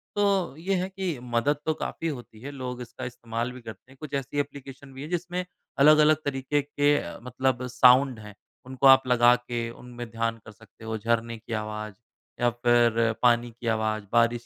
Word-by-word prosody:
तो 200 -7 +1
ये 190 +3 0
है 185 - -3
कि 190 -8 -4
मदद 125 +4 0
तो 160 - +1
काफ़ी 165 - -4
होती 120 -7 -7
है। 140 +3 -7
लोग 125 -3 -6
इसका 120 0 -8
इस्तेमाल 120 0 -4
भी 125 0 -11
करते 110 +2 -11
हैं। 135 - -18
कुछ 150 -2 -9
ऐसी 140 +1 -2
एप्लीकेशन 140 -1 -7
भी 135 - -9
हैं, 150 - -7
जिसमें 180 +1 -3 0.3
अलग-अलग 155 +1 +6
तरीके 140 +1 0
के 145 0 +1
अ, 85 - -6
मतलब 125 0 -1
साउंड 125 0 +5
हैं। 105 -1 -11 0.3
उनको 130 +1 +2
आप 135 -1 +7
लगा 120 0 +5
के 120 -1 -4
उनमे 120 0 -9
ध्यान 115 0 -2
कर - - -10
सकते 110 +1 -19
हो। 110 0 -3
झरने 115 +1 -1
की 115 +1 -8
आवाज़ 105 -1 -6 0.5
या 120 - +4
फिर 120 -1 +2
पानी 120 -1 +3
की 120 - -6
आवाज़, 110 -1 0
बारिश 120 0 +2
125 Hz, 190 wpm, -26 LUFS, 115-140 Hz, 0.5 s, आप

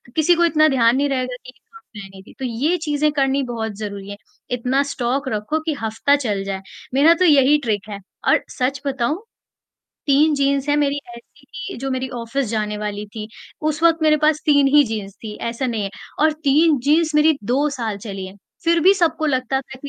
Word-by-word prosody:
किसी 320 +2 +4
को 345 - +3
इतना 310 -2 +4
ध्यान 240 -4 +3
नहीं 285 +1 +1
रहेगा 255 -2 -2
कि 255 - -10
क्या - - -34 0.3
पहनी 195 -2 -10
थी, - - -16
तो 265 - -3
ये 265 +9 0
चीज़ें 300 -2 0
करनी 275 -1 +1
बहुत 230 -3 -4
ज़रूरी 200 -2 -6
है। 205 - -7 0.3
इतना 250 +3 +1
स्टॉक 270 0 -2
रखो 215 +8 -2
कि 320 - 0
हफ़्ता 225 +6 +1
चल 210 -9 -2
जाए। 195 -1 -4 0.3
मेरा 290 +5 +6
तो 365 - +4
यही 290 -2 +5
ट्रिक 210 -3 -2
है। 200 -1 -6 0.3
और - - +4
सच 260 +1 -1
बताऊँ 275 - -1 0.9
3 295 +3 +4
जीन्स 280 0 0
हैं 290 - +3
मेरी 285 -1 +1 0.2
ऐसी 275 +4 -18
की 275 +1 -8
जो 270 - -4
मेरी 260 0 -2
ऑफ़िस 245 +4 -2
जाने 210 -1 -2
वाली 210 0 -4
थी, 215 +1 -8 0.3
उस 310 0 -2
वक़्त 335 -1 +4
मेरे 305 -1 +4
पास 305 0 +2
3 285 -2 +5
ही 295 - +8
जीन्स 210 -4 -5
थी 210 - -6
ऐसा 235 +3 -3
नहीं 230 -4 -2
है। 195 - -4 0.3
और 310 +1 +4
3 295 +2 +4
जीन्स 310 +2 +2
मेरी 300 0 +4
2 270 +6 +1
साल 230 -7 -3
चली 195 -2 -6
हैं, 190 +1 -12 0.3
फिर 335 0 +3
भी 385 +4 +6
सबको 325 -4 +1
लगता 265 -1 0
था 265 0 -12
कि 285 - -7
270 Hz, 210 wpm, -20 LUFS, 225-300 Hz, 0.9 s, ही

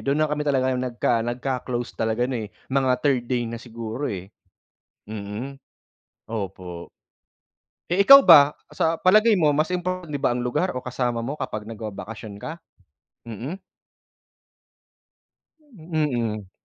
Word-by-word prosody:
dun 140 +3 +1
na 155 - +2
kami 150 0 -2
talaga 130 -3 +1
nagka 125 -1 0
nagka-close 125 0 -3
talaga 115 +2 0
ano 130 - -2
eh, 105 - -12 0.2
mga 130 -1 +2
third 130 -4 +1
day 120 -1 -1
na 115 - -5
siguro 115 +2 -6
eh. 95 -7 -4 0.8
Mm, 110 +6 -7 0.7
opo. 90 -5 -6 1.0
Eh 185 +3 +3
ikaw 275 +5 +11
ba, 150 - +8 0.2
sa 165 0 -1
palagay 215 +5 +5
mo 175 -7 +3
mas 155 +4 +1
importante 180 -2 -3
din 145 - -3
ba 120 - +1
ang 125 - -2
lugar 130 +6 -1
o 125 - -5
kasama 120 -2 -2
mo 145 +5 -5
kapag 110 -5 -4
nagbabakasyon 110 -1 -7
ka? 155 +10 -7 0.7
Mm. 130 - -6 2.0
Mm. 150 - -3
125 Hz, 135 wpm, -24 LUFS, 115-155 Hz, 2.0 s, ikaw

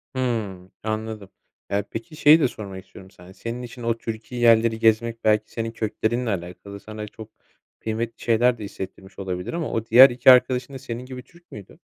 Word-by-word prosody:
Hımm. 105 -8 -3
Anladım. 110 -2 -4 0.4
Ya, 100 0 0
peki, 115 +7 -7
şeyi 150 +2 +6
de 140 - +3
sormak 95 -4 -9
istiyorum 95 0 -15
sana. 90 +1 -15
Senin 115 +4 -6
için 120 0 -9
o 115 0 0
Türki 115 +1 -7
yerleri 115 -1 +4
gezmek 115 +1 +2
belki 105 0 +2
senin 115 -1 -4
köklerinle 115 +2 -2
alakalı. 95 +2 -6
Sana 105 +1 -8
çok 110 +1 -11 0.5
kıymetli 115 +1 -4
şeyler 120 +1 +3
de 105 - -8
hissettirmiş 95 0 -9
olabilir 90 - -4
ama 170 -2 -3
o 115 0 -2
diğer 130 +4 +9
2 125 +1 +6
arkadaşın 125 +1 +3
da 135 - -7
senin 125 -1 -6
gibi 125 -1 -8
Türk 170 0 -23
müydü? 100 -3 -12
115 Hz, 180 wpm, -23 LUFS, 105-120 Hz, 0.5 s, diğer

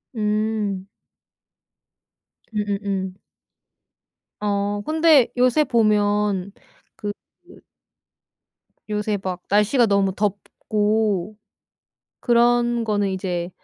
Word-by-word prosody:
음. 210 -2 -1 1.6
음음음. 200 -2 -2 1.3
어 205 0 -1
근데 315 -4 +4
요새 255 +5 +4
보면 210 -4 +1 0.4
그 205 - -4 0.3
그 - - -16 1.3
요새 210 0 -1
막 185 -1 -4
날씨가 210 +5 +3
너무 200 -2 +2
덥고 210 0 -1 0.9
그런 240 -1 +2
거는 205 -3 0
이제 180 -2 -3
210 Hz, 130 characters per minute, -22 LUFS, 200-220 Hz, 1.6 s, 근데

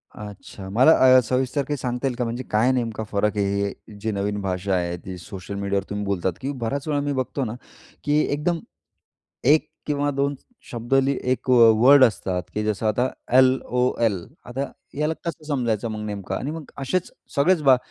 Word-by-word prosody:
अच्छा 100 -2 -9
मला 125 +10 +5 0.3
अ, - - +8
सविस्तर 130 +4 0
काय 145 -1 -1
सांगता 125 +1 -2
येईल 125 - -2
का? 125 - 0
म्हणजे 120 +2 -3
काय 115 +5 +3
नेमका 115 -3 -2
फरक 105 +1 0
आहे 100 - +2 0.2
हे 105 +1 -11
जे 110 +1 -1
नवीन 100 0 -2
भाषा 95 0 -2
आहे, 85 -1 -1
ती 90 +1 -8
सोशल 95 +2 -8
मीडियावर 100 0 -1
तुम्ही 100 0 -3
बोलतात 95 -2 -1
की 135 - -2
बऱ्याच 135 +2 -3
वेळा 145 -2 +1
मी 145 0 -1
बघतो 130 +1 -2
ना, 110 - -4 0.5
की 145 +1 +2
एकदम, 165 +3 0 0.9
1 150 +4 +4 0.2
किंवा 145 -1 0
2 140 +1 0
स - - -18 0.3
शब्द 120 +2 -2
लिह 135 0 +3
एक 130 - -1
वर्ड 125 +3 +7
असतात 95 -6 0
की 105 - -1
जसं 110 +1 -1
आता 120 +4 +1 0.3
एल-ओ-एल. 125 -4 +2 0.3
आता 125 +3 -4 0.3
ह्याला 150 +2 0
कसं 165 -2 -5
समजायचं 120 -6 -1
मग 110 0 -5
नेमकं? 100 -2 -4
आणि 140 - -3
मग 160 -2 -8
असेच 155 +7 -1 0.2
सगळेच 160 +4 +3
बा, 135 -2 +6
120 Hz, 185 wpm, -23 LUFS, 105-140 Hz, 0.9 s, अ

